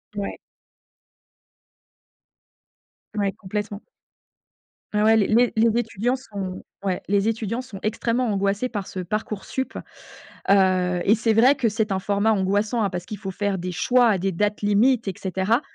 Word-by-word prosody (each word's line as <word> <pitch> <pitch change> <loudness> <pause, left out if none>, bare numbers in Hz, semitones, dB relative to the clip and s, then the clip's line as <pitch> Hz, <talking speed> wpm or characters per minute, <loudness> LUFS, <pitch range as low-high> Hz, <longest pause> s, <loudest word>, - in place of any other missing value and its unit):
Ouais. 200 -1 -4 2.8
Ouais, 200 -2 0
complètement. 205 +1 -5 1.1
Ah, 210 0 +2
ouais, 220 +1 +5
les 205 - +3
les 240 +2 +4
les 225 +1 +3
étudiants 230 +2 -1
sont, 200 -8 -6 0.2
ouais, 190 -2 -1
les 200 +1 +2
étudiants 225 +1 -1
sont 210 -7 -10
extrêmement 230 +3 0
angoissés 200 +5 0
par 205 -5 -4
ce 185 - -6
Parcoursup. 215 +6 -3 0.8
Heu, 185 -2 +3
et 215 - +5
c'est 225 +1 +1
vrai 245 +6 +5
que 255 -5 +1
c'est 215 0 -1
un 190 - +1
format 200 +3 +1
angoissant, 205 +4 +1
hein, 200 - +1
parce 180 -1 -5
qu'il 210 0 -6
faut 195 -2 -5
faire 200 0 -1
des 180 +1 -4
choix 245 +7 +3
à 205 -4 +3
des 195 +2 0
dates 210 +4 -1
limites, 215 +3 +3
et 195 - -1
cetera. 190 +6 0
205 Hz, 155 wpm, -23 LUFS, 195-225 Hz, 2.8 s, ouais